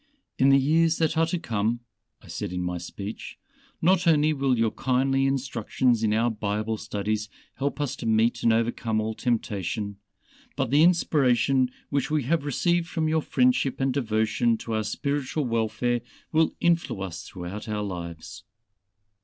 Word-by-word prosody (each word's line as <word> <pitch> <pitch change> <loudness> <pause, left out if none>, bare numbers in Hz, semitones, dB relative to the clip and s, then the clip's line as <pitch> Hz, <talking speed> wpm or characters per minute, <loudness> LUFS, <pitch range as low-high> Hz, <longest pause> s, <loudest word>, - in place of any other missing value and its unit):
"In 135 - +5
the 135 - +7
years 160 +4 +3
that 160 -1 +1
are 165 0 +3
to 180 - -1
come," 115 -6 -1 0.4
I - - -15
said - - -5
in 90 0 -3
my 90 0 -2
speech, 100 +5 -7 0.5
"not 180 0 +3
only 155 -1 +4
will 135 -3 +1
your 115 -1 +2
kindly 135 +1 +1
instructions 125 -3 0
in 110 -1 +2
our 115 +2 +2
Bible 105 +1 -2
studies 105 0 -3 0.3
help 140 +2 -2
us 145 -3 -1
to 115 - -5
meet 110 +1 +2
and 115 - +4
overcome 115 -1 0
all 110 +1 -2
temptation, 105 -3 -2 0.6
but 135 -3 -1
the 145 +2 +5
inspiration 135 -6 +3 0.2
which 140 0 0
we 150 -2 +1
have 155 +3 0
received 170 +4 +1
from 160 -2 -1
your 160 0 +2
friendship 250 - +1
and 135 -1 +1
devotion 115 -2 +1
to 115 - -5
our 110 0 0
spiritual 140 +6 -2
welfare 115 +1 0 0.3
will 160 0 +2
influence 120 - 0
us - - -8
throughout 95 +4 -7
our 105 -1 -2
lives." 85 -5 -7
120 Hz, 160 wpm, -26 LUFS, 110-145 Hz, 0.6 s, the